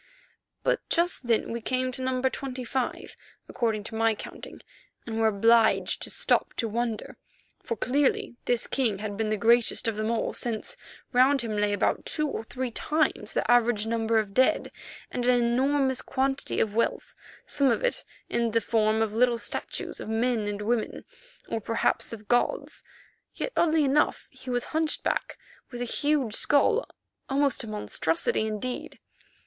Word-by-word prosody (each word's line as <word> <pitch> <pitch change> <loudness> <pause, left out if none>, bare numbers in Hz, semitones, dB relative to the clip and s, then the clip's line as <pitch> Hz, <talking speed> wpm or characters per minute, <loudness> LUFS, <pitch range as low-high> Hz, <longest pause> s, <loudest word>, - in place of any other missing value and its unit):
But - - +2
just 340 -7 0
then 230 -1 +1
we 235 0 -3
came 255 +2 0
to 255 - -5
No. 255 0 -1
25, 260 -1 -3 0.3
according 220 -3 -1
to 225 - -7
my 225 0 +2
counting, - - -10 0.4
and 225 -1 -3
were 225 - +4
obliged 225 +2 +3
to - - -2
stop - - +1
to 230 - -1
wonder, 225 0 -3 0.4
for 230 - -3
clearly 265 +2 +1
this 245 -1 +1
king 235 -7 0
had 205 0 -5
been 215 +1 -1
the 215 - 0
greatest 235 +2 +3
of 225 -2 -1
them 215 +1 -1
all, 230 -1 -1
since 225 -3 -3 0.4
round 265 +2 +5
him 225 -2 -3
lay 205 0 +1
about 205 - +1
two 305 -1 0
or 275 - -4
three 250 +2 -4
times 310 +6 0
the - - +1
average 240 -3 +3
number 225 0 +1
of 210 -2 0
dead, 260 +3 +2 0.4
and 245 0 -1
an 250 -1 +5
enormous 265 +2 +2
quantity 270 +1 -1
of 210 - +1
wealth, 230 +2 -1 0.3
some 280 -2 +2
of 245 - +1
it - - 0 0.2
in 235 -1 0
the 230 +1 +2
form 220 0 +2
of 215 -1 -3
little 240 +1 +3
statues - - -3
of - - -6
men 225 -1 0
and 205 0 -3
women, 230 0 -1 0.4
or 225 - -3
perhaps 225 +2 0
of 215 -2 -9
gods. 245 - 0 0.5
Yet, - - -3
oddly 320 -2 +3
enough, 285 +2 +2
he 260 -1 -11
was 245 -1 0
hunchback 315 -1 0 0.3
with 245 - -7
a - - -1
huge 285 -2 +1
skull, 295 - +3 0.4
almost 275 -1 +1
a - - -7
monstrosity 210 -1 -1
indeed. 220 +4 -4
235 Hz, 165 wpm, -27 LUFS, 220-260 Hz, 0.5 s, round